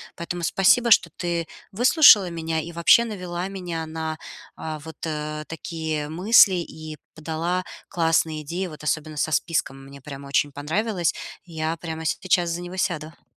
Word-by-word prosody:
Поэтому 175 +1 -5
спасибо, 195 +8 +3
что 200 - +5
ты 170 -2 -2 0.3
выслушала 230 - +6
меня 165 -1 -2
и 170 +2 -8
вообще 170 +8 +5
навела 180 -4 -4
меня 175 -4 -5
на, 160 0 -4 0.4
а, 155 -1 -6
вот, 160 +1 -11
э, 150 -1 -4
такие 160 -2 -4
мысли, 190 +4 +5
и 155 -3 -6 0.2
подала 165 +4 -2 0.3
классные 165 -3 +1
идеи, 170 +6 -4
вот 155 -3 -11
особенно 155 0 -2
со 155 - 0
списком. 135 -3 -1
Мне 140 0 -13
прямо 140 0 -9
очень 140 +1 +1
понравилось. 170 +6 -1 0.3
Я 160 -1 -3
прямо 160 -1 -6
сейчас 175 +1 +1
за 170 +1 -3
него 175 +1 -7
сяду. 160 -4 -3
165 Hz, 155 wpm, -24 LUFS, 155-180 Hz, 0.4 s, выслушала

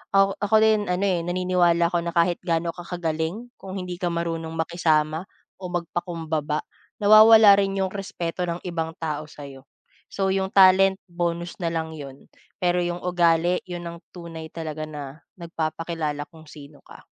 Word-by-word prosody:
Ako 195 0 +4
ako 205 +2 +1
din 215 -1 +3
ano, 180 +1 0
eh, 180 -3 +1
naniniwala 175 -1 +2
ako 175 - +1
na 170 - -3
kahit 170 +1 +3
gaano 170 -1 0
ka 175 - -10
kagaling, 170 +6 -3
kung 190 - -9
hindi 180 -1 -5
ka 175 - 0
marunong 165 -1 -3
makisama 160 0 0 0.4
o 185 - -6
magpakumbaba, 165 -3 -3 0.4
nawawala 215 0 +8
rin 195 -1 0
yung 190 - 0
respeto 180 -3 -4
ng 170 0 -4
ibang 165 -1 -3
tao 155 -1 -3
sa'yo. 140 -3 -11 0.5
So 195 -1 0
yung 190 0 -2
talent, 190 0 +6
bonus 170 0 -3
na 170 - 0
lang 160 -1 -2
yun, 140 -2 -11 0.3
pero 180 0 +2
yung 175 0 -3
ugali, 175 0 +2
yun 175 -1 -6
ang 170 - -9 0.2
tunay 165 -2 -8
talaga 155 -2 -5
na 145 -1 -8 0.2
nagpapakilala 160 -2 -3
kung 160 -1 -16
sino 145 -1 -13
ka. - - -15
170 Hz, 160 wpm, -24 LUFS, 160-180 Hz, 0.5 s, nawawala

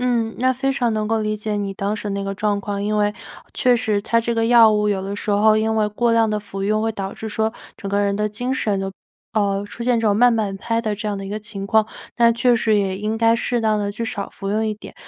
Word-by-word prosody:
嗯， 235 -3 0
那 255 +2 +3
非 270 +2 -1
常 245 -4 0
能 215 -1 -1
够 225 0 0
理 215 0 -1
解 210 0 -3
你 200 -1 -3
当 200 +2 -2
时 210 -1 -5
那 200 0 -3
个 195 0 -3
状 205 0 0
况， 200 0 -4
因 210 +1 0
为 210 0 +2 0.4
确 250 -1 +3
实 215 -3 0
它 230 +3 +1
这 235 0 -2
个 225 0 +1
药 230 -2 +7
物 210 0 +1
有 195 -2 0
的 195 +1 -4
时 205 - -3
候 215 +1 +4
因 220 +1 +1
为 215 -1 +2
过 230 +3 +1
量 230 -1 +3
的 210 0 -1
服 195 -1 -7
用 215 +2 +1
会 225 - 0
导 195 -2 -5
致 220 - -7
说， 220 +1 -1 0.2
整 200 - -6
个 200 0 +1
人 200 -1 +1
的 210 +1 0
精 245 +5 -3
神 205 -6 0
就 195 0 -3 0.4
呃， 200 -1 +1
出 230 - -8
现 240 -1 +2
这 225 - 0
种 205 -1 +3
慢 245 +1 +5
半 205 -3 -1
拍 230 +3 -1
的 215 -2 -2
这 210 +1 -6
样 205 -1 -1
的 195 - -6
一 - - -7
个 210 +2 -3
情 205 -2 -6
况， 220 +1 +3 0.3
那 235 -1 +5
确 240 +1 +3
实 220 -1 +2
也 190 -2 -1
应 215 +2 -2
该 230 0 +4
适 240 0 -1
当 215 -1 +1
地 205 -1 -2
去 230 +3 -4
少 205 -3 -4
服 195 - -7
用 220 +2 0
一 215 - 0
点。 215 - -12
215 Hz, 305 characters per minute, -21 LUFS, 205-225 Hz, 0.4 s, 药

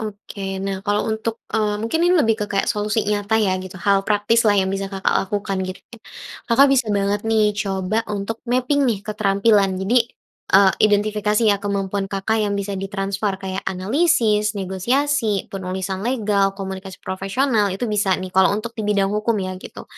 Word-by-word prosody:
Oke, 200 -2 -6
nah 195 -1 -2
kalau 205 +2 0
untuk 220 +1 -4
eee, 210 -1 0
mungkin 230 +9 -1
ini 360 - +4
lebih 225 -3 +2
ke 210 - -1
kayak 200 +4 0
solusi 210 0 0
nyata 210 +1 +1
ya 200 -3 +2
gitu, 185 0 -9
hal 200 0 +3
praktislah 210 +1 +3
yang 190 0 -1
bisa 195 0 -2
Kakak 195 0 0
lakukan, 200 -2 -2
gitu. 185 - -6 0.7
Kakak 270 +4 +6
bisa 255 -4 +2
banget 200 +1 0
nih 220 -1 +3
coba 195 +1 -1
untuk 210 +2 -3
mapping 255 +3 +2
nih 205 -4 -1
keterampilan 200 -1 +2
jadi, 230 +6 +3 0.6
eee, 195 -1 +6
identifikasi 210 +1 +2
ya 200 - -1
kemampuan 200 -1 -2
Kakak 200 +3 -1
yang 205 -1 0
bisa 200 -1 -3
ditransfer 195 0 -2
kayak 190 0 -4
analisis, 210 - +1
negosiasi, 220 +3 0
penulisan 190 0 -4
legal, 205 -5 +1
komunikasi 190 -1 -6
profesional, 205 +4 0
itu 245 - -3
bisa 205 -2 +2
nih 185 0 -6
kalo 190 +1 +4
untuk 230 +2 -5
dibidang 205 -2 +1
hukum 215 +1 0
ya, 185 - -4
gitu. - - -10
205 Hz, 165 wpm, -21 LUFS, 195-220 Hz, 0.7 s, Kakak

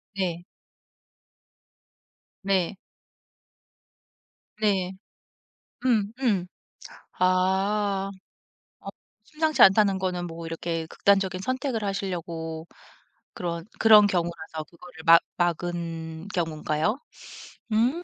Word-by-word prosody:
네. 175 -2 -2 2.0
네. 195 -1 0 1.8
네. 195 -4 +1 0.9
음 220 -4 +2
음. 200 -8 +1 0.7
아. 195 +2 +1 0.7
어 - - -14 0.4
심상치 310 +4 0
않다는 195 -1 +6
거는 180 -2 -2
뭐 165 0 -8
이렇게 165 0 -3
극단적인 195 -1 +2
선택을 255 -2 -2
하시려고 170 -4 -4 0.7
그런 170 -1 -4
그런 215 -2 +8
경우라서 170 -4 -3
그거를 170 -1 -13
막 165 0 +8 0.2
막은 170 0 -3
경우인가요? 160 - -1 0.8
음. 255 +11 +2
185 Hz, 165 characters per minute, -26 LUFS, 170-205 Hz, 2.0 s, 그런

